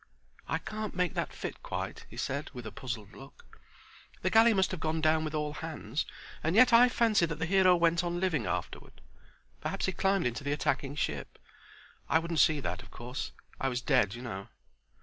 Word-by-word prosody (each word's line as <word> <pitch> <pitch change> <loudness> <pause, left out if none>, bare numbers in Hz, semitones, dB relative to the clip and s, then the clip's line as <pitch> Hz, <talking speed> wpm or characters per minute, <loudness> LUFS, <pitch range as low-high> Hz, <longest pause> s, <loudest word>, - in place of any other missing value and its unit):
"I - - 0
can't 215 -1 -5
make 180 -2 +1
that - - -2
fit - - -6
quite," - - -5
he - - -12
said 140 +2 -2
with 125 -2 -7
a - - -5
puzzled 110 -5 -6
look. 135 +1 -15 0.6
"The - - +1
galley 225 +1 +7
must 190 -3 +2
have 185 - -4
gone 160 0 -1
down 155 0 +3
with 155 0 -3
all 150 -1 -1
hands 155 -1 -4 0.4
and 160 +4 +1
yet 250 +2 +7
I 245 +2 +8
fancy 220 -7 +3
that 165 -1 -4
the 165 - -1
hero 185 0 +5
went 170 0 +3
on 175 0 -2
living 180 - 0
afterward. 90 -1 -4 0.6
Perhaps - - -2
he 190 - 0
climbed 195 0 +1
into 125 +3 -2
the 145 0 0
attacking 140 -1 -1
ship. 75 - -3 0.7
I - - +5
wouldn't 165 0 -1
see 155 -3 +5
that, - - -3
of - - -15
course. 125 +3 -6 0.3
I 135 - +1
was 125 -1 -1
dead, 125 -6 +2
you 120 - -8
know." 100 -5 -6
155 Hz, 200 wpm, -31 LUFS, 135-180 Hz, 0.7 s, I